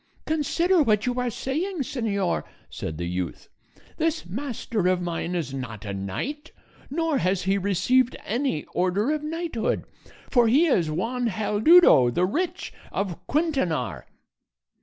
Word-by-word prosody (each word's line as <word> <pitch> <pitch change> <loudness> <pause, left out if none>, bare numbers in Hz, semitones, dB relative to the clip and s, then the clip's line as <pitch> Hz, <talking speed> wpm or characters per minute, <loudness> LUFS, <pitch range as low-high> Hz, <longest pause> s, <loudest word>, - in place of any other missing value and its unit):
"Consider 335 +3 +2
what 215 -6 +2
you 250 0 -1
are 250 0 0
saying, 315 - -2
señor," 210 -7 -1 0.3
said 80 +4 -5
the 85 - -3
youth; 90 -1 -4 0.5
"this 325 0 0
master 225 -1 -2
of 185 -1 +2
mine 175 0 -3
is 160 -6 -3
not 115 -6 -6
a 100 - -4
knight, 245 - -4 0.4
nor 320 0 0
has 185 -1 0
he 190 +2 +2
received 205 +7 +2
any 240 - -1
order 185 +8 +1
of 305 -1 -1
knighthood; 320 -5 -2 0.5
for 240 -3 +5
he 275 +9 +5
is 180 - +2
Juan 235 +10 -1
Haldudo 215 - +5
the 175 +9 +1
Rich, 345 - -2 0.2
of 195 -4 -2
Quintanar." 265 - -1
225 Hz, 140 wpm, -25 LUFS, 175-295 Hz, 0.5 s, for